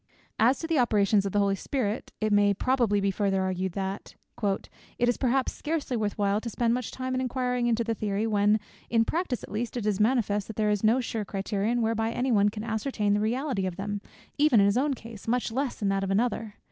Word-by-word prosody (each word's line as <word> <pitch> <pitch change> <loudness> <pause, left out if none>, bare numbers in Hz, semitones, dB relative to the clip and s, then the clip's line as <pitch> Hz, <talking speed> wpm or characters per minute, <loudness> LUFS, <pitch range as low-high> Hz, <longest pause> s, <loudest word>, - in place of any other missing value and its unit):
"As 245 +5 +4
to - - -5
the 325 -3 +1
operations 205 -4 +3
of - - -3
the 205 - 0
Holy 200 -1 +3
Spirit," 220 +1 -2
it 215 -1 +1
may 205 0 +4
probably 235 -3 +2
be 200 0 +1
further 195 -1 0
urged, 185 -1 -2
that 195 +1 -4 0.3
"it 200 -2 -1 0.4
is 240 - +3
perhaps 260 0 +1
scarcely 300 -4 -2
worth 210 -3 -1
while 205 0 +1
to 235 - -4
spend 230 0 +1
much 250 -1 -2
time 260 0 -4
in 255 - 0
inquiring 250 -1 0
into 235 0 +2
the 230 0 -1
theory, 210 0 -1
when, 210 0 +3 0.3
in 230 -1 +3
practice 320 -6 -2
at - - -9
least, 230 +3 -3
it 230 - -3
is 210 -2 0
manifest, 210 -3 +1
that 220 - -7
there 210 0 +1
is 210 0 -1
no 230 +4 +4
sure 225 -2 -3
criterion 205 +4 -1
whereby 225 0 0
any 250 +2 -1
one 205 -2 +4
can 210 0 -6
ascertain 220 -2 -1
the 205 - +2
reality 230 -2 -1
of 180 - -4
them, 205 +1 -4 0.4
even 295 -6 +5
in 200 - +5
his 200 +1 +3
own 275 +2 +1
case, 225 -3 -11
much 240 0 0
less 260 -2 -2
in 200 - +2
that 195 0 0
of 195 - -2
another. 220 +1 0
220 Hz, 230 wpm, -27 LUFS, 205-245 Hz, 0.4 s, even